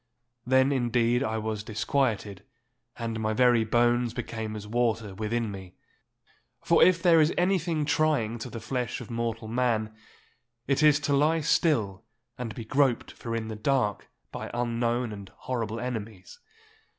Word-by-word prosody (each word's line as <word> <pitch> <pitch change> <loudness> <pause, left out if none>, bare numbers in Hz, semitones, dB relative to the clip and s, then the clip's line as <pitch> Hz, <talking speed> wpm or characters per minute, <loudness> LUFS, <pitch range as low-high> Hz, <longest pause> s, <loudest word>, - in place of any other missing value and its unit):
Then 130 +2 +4
indeed 120 -2 +1
I 110 -4 -1
was 110 -1 -3
disquieted, 110 -3 -1 0.5
and 115 -1 -3
my 110 0 0
very 120 0 +4
bones 120 +1 +2
became 110 -1 -4
as 105 -1 -7
water 115 -2 -1
within 110 +2 -2
me. 95 -2 -10 0.9
For - - +5
if 180 -2 +4
there 165 -3 +6
is 155 +2 +3
anything 175 -4 +1
trying 145 -7 +1
to 120 - -6
the 115 - -7
flesh 120 +1 -3
of 125 - -9
mortal 115 -1 -3
man, 115 -2 0 0.7
it 140 +2 +1
is 150 -1 +5
to 145 -1 0
lie 155 +3 +3
still 115 - +1 0.3
and 115 -3 -6
be 115 - -7
groped 130 +1 +1
for 115 -1 -5
in 110 -1 -3
the 110 - -5
dark 110 -2 0 0.2
by - - -6
unknown 120 -1 -1
and 100 -2 -9
horrible 115 -3 -3
enemies. 110 -6 -6
120 Hz, 150 wpm, -27 LUFS, 110-130 Hz, 0.9 s, there